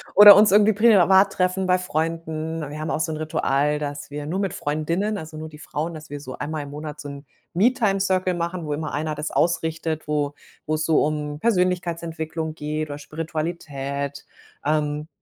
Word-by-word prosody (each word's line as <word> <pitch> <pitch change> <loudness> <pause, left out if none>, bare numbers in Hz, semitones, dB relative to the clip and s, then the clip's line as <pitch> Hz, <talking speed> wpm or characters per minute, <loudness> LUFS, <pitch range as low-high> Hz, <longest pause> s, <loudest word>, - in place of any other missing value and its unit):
oder 205 0 +12
uns 210 -1 +6
irgendwie 210 +1 +5
privat 195 -2 +5
treffen 185 +1 0
bei 185 0 +3
Freunden. 160 -1 -3
Wir 150 +1 -7
haben 155 - -3
auch - - -1
so 160 0 -1
'n 155 - -3
Ritual, 150 -1 0
dass 145 -1 -5
wir 145 0 -5
nur 185 +5 -2
mit 195 -3 -1
Freundinnen, 170 +8 -1
also, 160 -2 -8
nur 155 0 -6
die 150 - -13
Frauen, 160 +1 -4
dass 155 0 -10
wir 145 - -5
so 130 -2 -8
einmal 155 +1 -3
im 140 - -9
Monat 150 +1 -7
so 145 - -7
'n 140 +1 -9 0.3
Me-Time-Circle 195 -4 +2
machen, 170 0 -3
wo 150 - -2
immer 155 0 -4
Einer 155 +1 -2
das 150 +2 -4
ausrichtet, 160 -2 -1
wo 145 -1 0 0.3
wo's 155 0 0
so 160 -1 +3
um 150 -1 -2
Persönlichkeitsentwicklung 170 -5 -1
geht 155 0 -3
oder 145 0 -6
Spiritualität, 150 -3 -4 0.4
ähm, 150 0 0
160 Hz, 180 wpm, -23 LUFS, 150-180 Hz, 0.4 s, oder